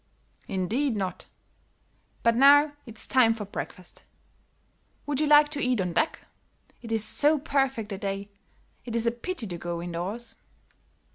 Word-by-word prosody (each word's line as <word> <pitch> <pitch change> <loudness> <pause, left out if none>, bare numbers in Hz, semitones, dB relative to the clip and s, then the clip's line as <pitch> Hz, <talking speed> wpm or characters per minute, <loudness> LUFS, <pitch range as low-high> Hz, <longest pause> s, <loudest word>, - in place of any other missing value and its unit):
"Indeed 220 +8 -1
not; 190 -3 -4 1.0
but 230 0 +4
now 290 +3 +6 0.2
it's 225 -1 -8
time 235 -4 +4
for 215 -2 -6
breakfast. 185 -2 -8 1.0
Would 290 -2 -2
you 305 - +2
like 295 0 +6
to 295 -1 -4
eat 250 -3 +1
on 180 -2 -1
deck? 315 - 0 0.6
It 230 - -8
is 220 -1 +1
so 295 +7 +3
perfect 270 -6 -1
a 195 - -4
day, 200 0 -4 0.5
it 235 -2 -6
is 230 0 +1
a 235 - +3
pity 240 +3 -5
to 175 -4 -6
go 175 0 -4
indoors." 175 +7 -5
230 Hz, 150 wpm, -27 LUFS, 195-280 Hz, 1.0 s, now